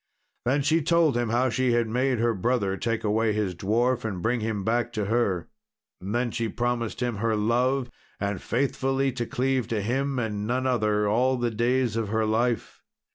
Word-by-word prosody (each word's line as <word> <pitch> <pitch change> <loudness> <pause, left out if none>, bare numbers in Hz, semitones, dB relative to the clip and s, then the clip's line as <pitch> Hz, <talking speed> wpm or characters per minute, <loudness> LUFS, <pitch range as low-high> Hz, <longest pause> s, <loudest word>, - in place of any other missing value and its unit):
Then 140 +3 +2
she 160 +4 +3
told 165 -2 +3
him 120 -2 0
how 125 +3 +2
she 125 +1 +1
had 120 -1 +2
made 125 +3 +1
her 115 +1 +2
brother 100 -1 0
take 115 +2 -2
away 110 +1 +1
his 105 -3 -1
dwarf 115 +8 0
and 100 -5 -3
bring 120 +2 +1
him 110 -2 -2
back 120 +2 0
to 105 -3 -1
her. 100 -5 0 0.5
And 100 +4 -4
then 120 0 0
she 115 0 -2
promised 120 0 -2
him 120 -4 -1
her 115 +1 0
love, 125 +4 +1 0.3
and 100 -2 -2
faithfully 135 +1 0
to 120 -2 -4
cleave 130 -2 0
to 115 -2 -1
him 135 +6 -1
and 105 -3 -2
none 130 +2 0
other 105 -4 +1
all 125 +5 +2
the 120 -1 -1
days 120 +1 +1
of 110 -3 -1
her 110 +1 +1
life. 115 +1 -1
120 Hz, 190 wpm, -26 LUFS, 110-125 Hz, 0.5 s, she